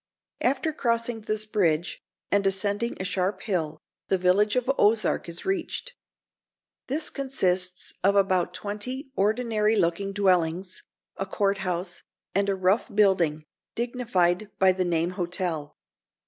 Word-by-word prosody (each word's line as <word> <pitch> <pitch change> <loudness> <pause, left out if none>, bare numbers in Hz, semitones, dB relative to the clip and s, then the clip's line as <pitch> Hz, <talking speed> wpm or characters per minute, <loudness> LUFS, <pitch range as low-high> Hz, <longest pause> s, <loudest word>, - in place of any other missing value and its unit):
After 270 +5 +1
crossing 230 -4 -1
this 215 0 +1
bridge, 175 -6 0 0.3
and 200 -1 +3
ascending 205 +4 0
a - - -2
sharp 185 +1 -1
hill, 160 -7 -2 0.3
the 190 - +2
village 190 +3 +3
of 250 -1 0
Ozark 210 -4 +2
is 170 - -3
reached. 385 +6 -2 0.9
This 300 +4 +1
consists 185 -10 0
of 200 +2 +4
about 185 -3 +2
twenty 210 - -4
ordinary 220 0 +1
looking 195 +1 0
dwellings, 185 -2 +1 0.4
a 195 - -3
court 200 0 0
house, 180 -1 -3 0.3
and 200 +1 +1
a 195 - +1
rough 190 +3 +2
building, 185 -7 +2 0.3
dignified 215 -6 0
by 190 -1 +5
the 185 0 -1
name 170 0 0
hotel. 175 -4 -3
195 Hz, 130 wpm, -26 LUFS, 180-220 Hz, 0.9 s, by